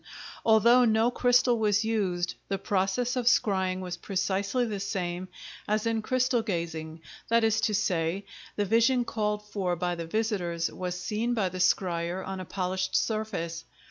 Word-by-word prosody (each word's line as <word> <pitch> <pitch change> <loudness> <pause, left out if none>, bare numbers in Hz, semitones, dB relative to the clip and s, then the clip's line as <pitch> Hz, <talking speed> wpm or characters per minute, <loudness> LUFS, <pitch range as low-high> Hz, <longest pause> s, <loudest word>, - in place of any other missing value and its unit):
Although 235 +3 +5
no 225 +1 +3
crystal 245 -1 +3
was 210 0 +2
used, 185 -6 0
the 195 - -1
process 200 +7 0
of 245 -2 -1
scrying 190 -6 +2
was 180 -1 -5
precisely 200 +5 -1
the 210 -3 -3
same 185 -2 -3 0.4
as 215 +1 0
in 225 -1 0
crystal 255 +1 +1
gazing,—that 165 +3 -3
is 220 0 +2
to 210 - +1
say, 185 -1 0 0.3
the 205 - 0
vision 230 +4 +3
called 210 -2 -2
for 190 -4 -1
by 175 +1 -1
the 170 -1 -5
visitors 180 -5 -1
was 180 -1 -4
seen 220 +6 -1
by 200 -5 +1
the 185 +1 -7
scryer 180 0 +1
on 190 0 -5
a 185 - -6
polished 185 +1 -2
surface. 200 -7 -1
200 Hz, 155 wpm, -28 LUFS, 180-225 Hz, 0.4 s, Although